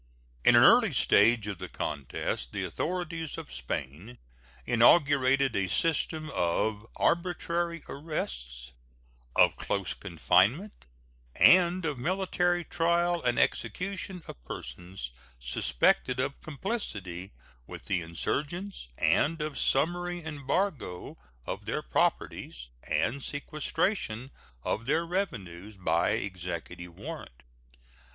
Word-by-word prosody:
In 120 - +7
an 120 - +8
early 230 -7 +6
stage 115 -2 +5
of 100 -4 -5
the - - -6
contest 65 -3 -3
the - - -2
authorities 165 -3 -3
of - - -8
Spain 70 - -5 0.5
inaugurated 135 +1 +4
a 95 -1 +1
system 155 - 0
of 105 +5 0
arbitrary 170 -1 0
arrests, 60 - -4 0.6
of - - +5
close 100 -3 -1
confinement, 100 - +1 0.5
and 180 0 +6
of 145 -5 -2
military 175 +2 +1
trial 170 +1 +1
and 120 -1 +1
execution 185 - -1
of - - -10
persons 85 +2 -7 0.3
suspected 60 - +1
of 135 +2 -2
complicity 100 - -4 0.4
with - - -9
the 90 -2 0
insurgents, 150 - -3
and 165 +3 +2
of 150 -1 -3
summary 175 +4 0
embargo 145 - -2 0.3
of - - -5
their - - -2
properties, - - -1 0.2
and 135 +5 0
sequestration 145 - -2 0.3
of 115 +3 -2
their 160 +4 +2
revenues 105 - -4
by 85 -2 +1
executive 90 -4 -5
warrant. 65 +1 -8
130 Hz, 105 wpm, -29 LUFS, -, 0.6 s, an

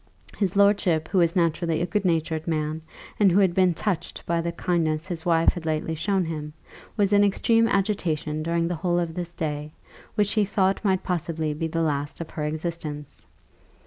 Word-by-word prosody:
His 195 -2 -1
lordship, 200 -6 +3
who 190 - +2
was 170 -1 +2
naturally 165 -1 +1
a 170 - 0
good 205 +2 -1
natured 160 -2 0
man, 155 -1 -1 0.4
and 200 -3 +5
who 175 - +3
had 190 -3 +3
been 185 -2 +3
touched 175 -2 -3
by 170 0 0
the 170 0 -2
kindness 165 -2 0
his 175 -2 -5
wife 165 -1 +4
had 175 - -7
lately 160 0 -1
shown 190 +3 0
him, 150 -2 -5 0.4
was 205 -1 +2
in 205 0 +6
extreme 225 +3 +3
agitation 180 -8 0
during 170 +1 0
the 175 - -1
whole 175 -1 +1
of 170 -2 -1
this 175 0 -5
day, 150 -1 -4 0.4
which 205 -2 +2
he 215 -1 +2
thought 195 0 +1
might 190 -3 +1
possibly 160 -3 -2
be 160 +2 -2
the 165 +1 -1
last 145 -2 -2
of 165 -1 -6
her 150 - -3
existence. 155 -2 -5
170 Hz, 190 wpm, -25 LUFS, 160-190 Hz, 0.4 s, in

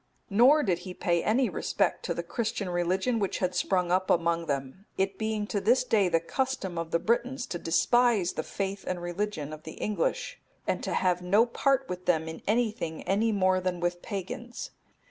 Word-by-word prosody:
Nor 260 +9 +6
did 180 -5 +1
he 180 0 -8
pay 170 -1 +1
any 245 +4 +3
respect - - -1
to - - -1
the - - -3
Christian 220 -5 -2
religion 185 +7 +1
which 200 -2 -1
had 180 -1 -1
sprung 180 0 +1
up 185 +1 +1
among 170 0 +2
them; 140 +7 -4
it 190 0 0
being 220 -1 -1
to 205 -1 -2
this 240 +6 +4
day 210 -7 +2
the 165 -1 +3
custom 200 0 -2
of 165 -1 -4
the 170 - +2
Britons 240 +7 0
to 175 -10 -5
despise 210 +3 +3
the - - -2
faith 195 0 -4
and 185 -1 -2
religion 175 -3 -3
of 155 - -8
the 160 - -9
English, - - -2 0.3
and - - -1
to - - -2
have 180 -1 +1
no 200 +6 +4
part 270 +2 +1
with 180 0 -6
them 160 -2 +2
in 160 - -7
anything 215 -7 0
any 215 +4 +1
more 185 -2 +2
than 180 -1 -2
with 175 0 -1
pagans. 215 +4 -6
190 Hz, 195 wpm, -28 LUFS, 175-225 Hz, 0.3 s, Nor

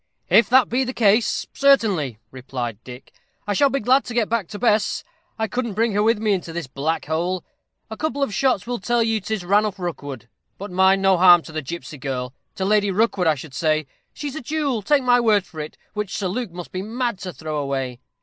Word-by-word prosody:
"If 235 - +6
that 255 -3 +5
be 255 +3 +1
the 255 0 -4
case, 215 0 +2
certainly," 205 - +3
replied 125 -4 -6
Dick. 125 +1 -12 0.3
"I 205 - -1
shall 280 +8 +4
be 275 +1 -1
glad 260 +4 +3
to 240 - -6
get 230 -3 +1
back 225 -6 0
to 210 - -7
Bess. 215 -2 +1 0.3
I 220 -1 -1
couldn't 235 -3 -3
bring 225 +1 +2
her 205 +1 +1
with 225 +1 +3
me 215 -1 +1
into 175 -3 -3
this 170 -1 -4
black 140 +5 -2
hole. 170 +3 -1 0.5
A - - -4
couple 285 +1 -2
of 265 - -2
shots 250 -2 +1
will 245 0 -3
tell 240 +4 +1
you 225 -1 +1
'tis 205 -2 -3
Ranulph 205 +2 +2
Rookwood. 145 - -6 0.3
But 200 0 -7
mind, 190 +1 +3
no 190 -1 +4
harm 175 -2 +7
to - - -11
the 155 0 -3
gipsy 155 0 -7
girl 125 -1 -4 0.2
to 190 -3 -2
Lady 205 0 +3
Rookwood, 195 -2 +1
I 155 - +4
should 140 0 -10
say. 155 +1 +1 0.3
She's 290 -1 -6
a 315 - -5
jewel, 280 -3 -1
take 275 +6 +2
my 245 -1 +4
word 215 -5 +3
for 160 -3 -11
it, 150 0 -6 0.2
which 210 -2 -3
Sir 190 -3 -1
Luke 240 +3 -3
must 175 0 -8
be 185 - -3
mad 235 0 -2
to 185 0 -5
throw 155 -3 -4
away." 135 -3 -3
200 Hz, 225 wpm, -22 LUFS, 160-235 Hz, 0.5 s, harm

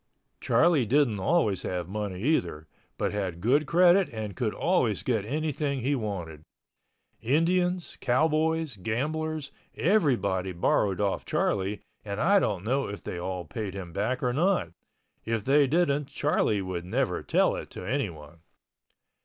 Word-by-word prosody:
Charlie 160 -8 +3
didn't 130 -5 +2
always 105 - +1
have 90 -2 -3
money 100 -1 -4
either, 85 - 0 0.3
but - - -1
had 95 -5 -3
good 135 - +2
credit 180 +4 +5
and 110 -3 -6
could 115 -4 -1
always 130 - +1
get 110 -5 0
anything 145 0 -2
he 135 +5 +1
wanted. 95 - -4 0.8
Indians, 175 +6 +1
cowboys, 155 +1 +1
gamblers, 150 +8 -2 0.2
everybody 110 - +1
borrowed 95 +2 +1
off 100 -2 0
Charlie 100 +1 -1 0.2
and 100 -1 -5
I 195 +5 +5
don't 100 - -1
know 135 +4 0
if 100 0 -7
they 90 - -5
all 90 0 -4
paid 105 -5 -5
him 90 -4 -7
back 125 +8 -1
or 125 -1 +1
not—if 140 - -3
they 140 +1 +4
didn't 150 -2 +1
Charlie 135 -8 0
would 90 -2 -4
never 90 - -1
tell - - +2
it - - -7
to - - -8
anyone. 85 - -4
120 Hz, 140 wpm, -27 LUFS, 95-155 Hz, 0.8 s, credit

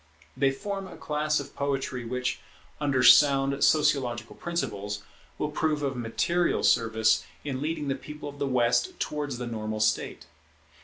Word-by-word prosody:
They 135 - +3
form 195 +7 -4
a 180 - -11
class 150 0 0
of 140 0 -8
poetry 135 -3 -2
which, 125 +2 -2 0.4
under 140 -4 +1
sound 140 +2 +6
sociological 135 -6 +2
principles, 105 -11 -3 0.3
will 150 - -2
prove 150 -1 0
of 135 -1 -1
material 170 +9 0
service 110 -1 +3 0.2
in 135 -2 -4
leading 155 -1 -2
the 135 - +1
people 150 +2 -8
of 145 0 -9
the 140 - 0
West 120 -1 +1
towards 145 -4 -3
the 125 - -4
normal 110 -2 -4
state. 110 0 0
135 Hz, 150 wpm, -27 LUFS, 120-150 Hz, 0.4 s, sound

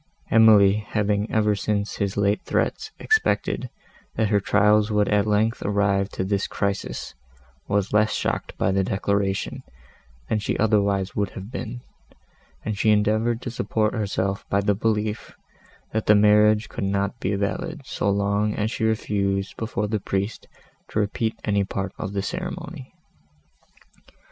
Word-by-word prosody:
Emily, 105 -3 +6
having, 105 0 -1
ever 105 -1 +2
since 100 +1 -2
his 100 -1 -2
late 100 +1 +2
threats, - - -1
expected, 440 0 +1 0.5
that 110 -2 +1
her 105 -1 +3
trials 105 +2 +3
would 105 -1 +2
at 105 0 +2
length 110 +2 +1
arrive 100 -1 +1
to - - -3
this 100 +1 -1
crisis, 100 -11 -3 0.5
was 100 0 0
less 105 0 +3
shocked - - -2
by 95 - +1
the 95 0 +2
declaration, 100 0 -1 0.7
that 110 - 0
she - - -1
otherwise 100 -3 +1
would 100 -1 0
have 100 +4 -8
been, 120 -1 -5 0.8
and 105 -2 -3
she 110 - +3
endeavoured 110 +3 +2
to 125 - -4
support 110 -2 0
herself 100 -3 -2
by 100 - +2
the 100 +1 +2
belief, 105 0 -2 0.6
that 110 0 -1
the 105 - +7
marriage 105 +1 +5
could - - -5
not 100 +3 -1
be 100 0 -1
valid, 150 - -3
so 100 - -1
long 100 +1 +1
as 105 +1 -1
she 115 - -3
refused 100 -3 0
before 105 -2 -2
the 110 0 -1
priest 100 +2 -3 0.4
to - - -6
repeat 110 +2 -1
any 100 -2 +1
part 95 0 -4
of 100 - -4
the 100 -1 -1
ceremony. 135 - -6
105 Hz, 150 wpm, -24 LUFS, 100-110 Hz, 0.8 s, the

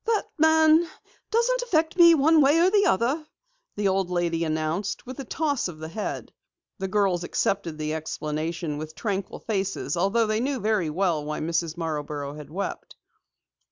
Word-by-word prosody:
"That 445 -2 +1
man 320 +1 +5 0.4
doesn't - - +2
affect 325 -10 +1
me 340 -2 +8
one 315 +2 +5
way 285 +3 +5
or 350 +3 +4
the 405 -1 +4
other," 260 - +1 0.5
the 205 -1 0
old 190 -1 +1
lady 170 -2 0
announced 160 +5 -2
with 255 +2 -8
a - - -3
toss 285 -2 -1
of 175 -3 -8
the 160 0 -7
head. 210 +5 -5 0.5
The 190 - -2
girls 190 -3 +1
accepted 175 -2 -1
the 155 0 -2
explanation 155 0 -3
with 155 +1 -7
tranquil 200 0 -3
faces 195 -4 -2
although 195 +6 +2
they 215 0 0
knew 265 +2 -1
very 210 -6 0
well 170 -2 0
why 150 +1 -4
Mrs. 165 0 -2
Marborough 150 -3 -4
had 150 -1 -10
wept. 195 +6 -5
195 Hz, 165 wpm, -25 LUFS, -, 0.5 s, me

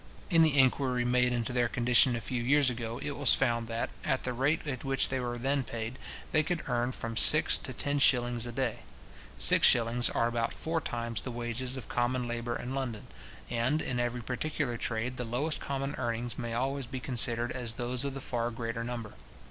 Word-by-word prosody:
In 165 -2 +5
the 155 -3 +3
inquiry 130 -2 +2
made 125 0 +2
into 120 0 -3
their 120 -1 0
condition 125 +2 +4
a 115 - -5
few 125 +2 -4
years 135 +2 +3
ago, 115 -1 -6
it 145 - -4
was 140 -4 +5
found 120 -3 -1
that, 115 0 -4
at 135 -3 -1
the 125 - -2
rate 140 +7 -1
at 135 -4 -5
which 135 -1 +1
they 130 - -2
were 120 -1 -4
then 135 +3 -1
paid, 115 +1 -6 0.3
they 155 - +3
could 160 +2 -4
earn 120 -1 -1
from 115 -2 -6
six - - +9
to - - -6
ten 145 0 -2
shillings 120 -3 +3
a - - -6
day. 125 -1 -3 0.6
Six - - +6
shillings 120 0 +4
are - - -1
about 115 -1 -2
four 165 0 -3
times 115 -4 -3
the - - -7
wages 120 +2 -4
of 125 - -9
common 125 0 -2
labour 120 0 -4
in 125 - -6
London; 125 -6 -5 0.4
and, 120 +6 -1
in 125 -5 -3
every 120 0 -3
particular 130 +1 -3
trade, 120 +1 -3
the 125 - -3
lowest 125 +7 -2
common 135 0 -4
earnings 120 -1 -3
may 120 -3 -5
always 135 +1 -3
be 130 - -6
considered 120 -2 +2
as 120 -3 -2
those 125 +1 +1
of 140 -1 -4
the 135 - -6
far 120 -2 -3
greater 115 0 -5
number. 115 -3 -6
125 Hz, 205 wpm, -29 LUFS, 120-135 Hz, 0.6 s, six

